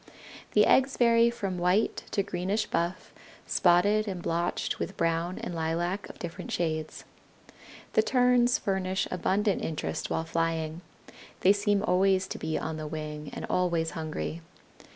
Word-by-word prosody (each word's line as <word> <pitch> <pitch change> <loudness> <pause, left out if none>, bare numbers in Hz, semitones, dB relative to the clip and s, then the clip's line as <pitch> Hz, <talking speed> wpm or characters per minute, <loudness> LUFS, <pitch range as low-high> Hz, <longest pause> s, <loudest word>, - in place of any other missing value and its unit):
The - - +6
eggs 265 +1 +3
vary 235 -1 +5
from 195 -6 -3
white 180 +5 +1
to 200 - 0
greenish 195 +3 -1
buff, 170 +2 -2 0.3
spotted 205 +5 +3
and 190 -3 -3
blotched 170 0 -1
with - - -4
brown 165 +2 0
and 180 - -5
lilac 170 +4 -2
of - - -11
different 170 -1 -7
shades. 155 -2 -2 0.9
The - - +5
Terns 245 0 +3
furnish 190 -2 -1
abundant 195 +3 0
interest 155 -2 -3
while 160 - -1
flying. 165 0 -1 0.6
They 195 - +6
seem 205 0 +1
always 190 -1 +3
to - - -5
be 160 0 -2
on 160 0 -4
the 155 -1 -5
wing, 150 -1 -6
and - - -5
always 170 -3 0
hungry. 160 +1 -4
180 Hz, 145 wpm, -28 LUFS, 165-205 Hz, 0.9 s, The